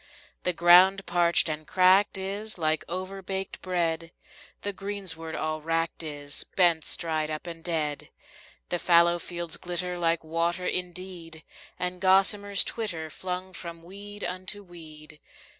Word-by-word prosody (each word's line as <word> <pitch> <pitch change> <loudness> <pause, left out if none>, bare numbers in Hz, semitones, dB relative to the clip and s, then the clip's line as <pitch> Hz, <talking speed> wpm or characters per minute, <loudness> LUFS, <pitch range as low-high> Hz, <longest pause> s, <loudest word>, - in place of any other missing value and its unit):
The 180 - +2
ground 180 +3 +6
parched 170 0 +3
and 155 -1 -4
cracked 190 +2 +4
is 200 +3 -3
like 155 -2 +1
overbaked 190 +1 -4
bread, 170 -2 -1 0.5
The 205 - 0
greensward 185 -5 -3
all 155 0 -2
wracked 165 +1 -1
is, 145 -2 -4
bents 170 -4 +3
dried 155 -2 -1
up 155 +1 -5
and 165 -1 -8
dead. 155 -4 -2 0.6
The 175 - 0
fallow 170 0 +5
fields 170 -1 -5
glitter 180 0 -3
like 165 -1 +1
water 170 +3 -1
indeed, 180 -3 -3 0.3
And 180 0 -3
gossamers 195 +1 +4
twitter, 165 -9 -4
flung 185 +2 -5
from 170 -1 -8
weed 205 +3 -9
unto 185 +3 -3
weed. 155 -4 -12
175 Hz, 130 wpm, -27 LUFS, 165-185 Hz, 0.6 s, ground